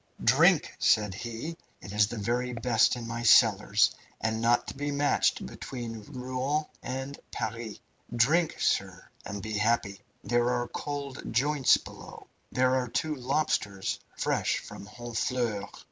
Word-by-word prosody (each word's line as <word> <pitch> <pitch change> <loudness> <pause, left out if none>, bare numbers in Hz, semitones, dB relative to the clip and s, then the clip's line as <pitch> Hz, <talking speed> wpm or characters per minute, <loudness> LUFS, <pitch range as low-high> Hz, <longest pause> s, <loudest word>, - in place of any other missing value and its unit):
"Drink!" - - +5
said 105 -2 +3
he. 120 - -5 0.2
"It 100 - -10
is 105 0 +4
the 115 - -6
very 120 +4 -1
best 125 +2 +3
in 120 -2 -6
my 115 0 -4
cellars, 105 -3 +5 0.3
and 110 0 -1
not 120 +1 +3
to - - -6
be 145 +1 -3
matched 145 0 +1
between 115 -4 -6
Rouen 130 +4 -2 0.2
and 135 +3 -5
Paris. 110 -1 -4 0.3
Drink, 150 +8 +2
sir, 95 -1 -1 0.2
and 100 0 -5
be 110 - -4
happy! 105 -3 0 0.2
There 120 0 +2
are 120 -1 0
cold 140 -2 -5
joints 140 +3 +4
below. - - -11 0.3
There 130 0 +2
are 125 -1 -1
two 155 +6 -1
lobsters, 125 -8 -1 0.2
fresh - - +1
from 100 - -9
Honfleur. 115 -2 -2
120 Hz, 140 wpm, -29 LUFS, 110-130 Hz, 0.3 s, Drink